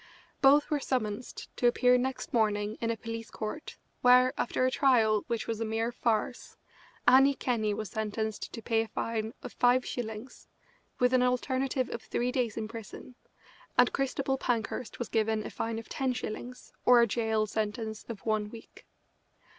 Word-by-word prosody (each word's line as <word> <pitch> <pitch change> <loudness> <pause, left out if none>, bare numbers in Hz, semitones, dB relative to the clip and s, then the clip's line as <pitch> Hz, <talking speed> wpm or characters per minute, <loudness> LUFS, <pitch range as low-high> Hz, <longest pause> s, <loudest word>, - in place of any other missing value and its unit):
Both 290 +2 +5
were 295 - +2
summonsed 245 -4 -3
to 245 - +3
appear 250 +1 +4
next 260 +1 -2
morning 210 -2 +1
in 230 - 0
a 230 - -1
police 230 +1 -6
court, 220 +8 -6 0.2
where, 250 +1 +6
after 255 - 0
a 255 - +2
trial 225 -7 +3
which 235 -2 -2
was 225 -1 -3
a - - +2
mere 225 +1 -1
farce, 235 +1 -2 0.5
Annie 270 +2 +7
Kenney 230 -5 0
was 215 -1 -5
sentenced 220 0 -3
to 230 - -8
pay 225 -2 +2
a 225 - -4
fine 220 0 -3
of - - -7
five 250 +1 +3
shillings, 220 +1 -6 0.5
with 250 0 +2
an 255 - +5
alternative 255 +1 0
of 230 - -4
three 245 +2 -1
days 240 -4 -1
in 220 -1 -2
prison, 225 +2 -9 0.6
and - - +5
Christabel 270 0 -1
Pankhurst 235 -1 -2
was 240 - -4
given 220 -1 0
a - - -6
fine 225 0 -3
of 225 - -7
ten 265 -2 -1
shillings 250 +1 -7
or 245 -1 +7
a - - +5
jail 220 -1 0
sentence 220 +1 -3
of 220 -4 -7
one 215 -1 0
week. 225 +1 -13
230 Hz, 170 wpm, -30 LUFS, 220-250 Hz, 0.6 s, Annie